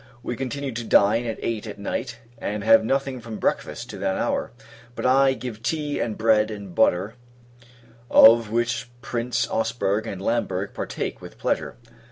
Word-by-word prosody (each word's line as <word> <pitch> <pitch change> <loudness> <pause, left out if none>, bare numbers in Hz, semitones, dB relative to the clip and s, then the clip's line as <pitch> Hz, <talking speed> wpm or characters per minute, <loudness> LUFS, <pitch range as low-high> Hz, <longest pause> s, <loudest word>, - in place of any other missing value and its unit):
We 120 - -3
continue 135 +2 -4
to 120 0 -4
dine 115 +2 +3
at 115 - -3
eight 115 -1 -2
at 105 - -7
night, 115 +3 -4 0.2
and 105 -1 -3
have 115 +1 +6
nothing 135 +1 -1
from 110 -2 -7
breakfast - - -2
to - - -8
that - - -1
hour. - - -1 0.4
But - - -4
I 135 +1 +5
give 120 -4 -7
tea 150 +2 -2
and 110 -3 -2
bread 110 -1 +3
and 100 -4 -8
butter, 100 0 +2 1.0
of 115 -1 +7
which 120 0 -1
Prince 120 -1 -1
Ausberg 110 -2 -1
and 95 - -5
Lamberg 100 -2 -1
partake - - -4
with - - -11
pleasure. - - -2
115 Hz, 165 wpm, -24 LUFS, 105-120 Hz, 1.0 s, of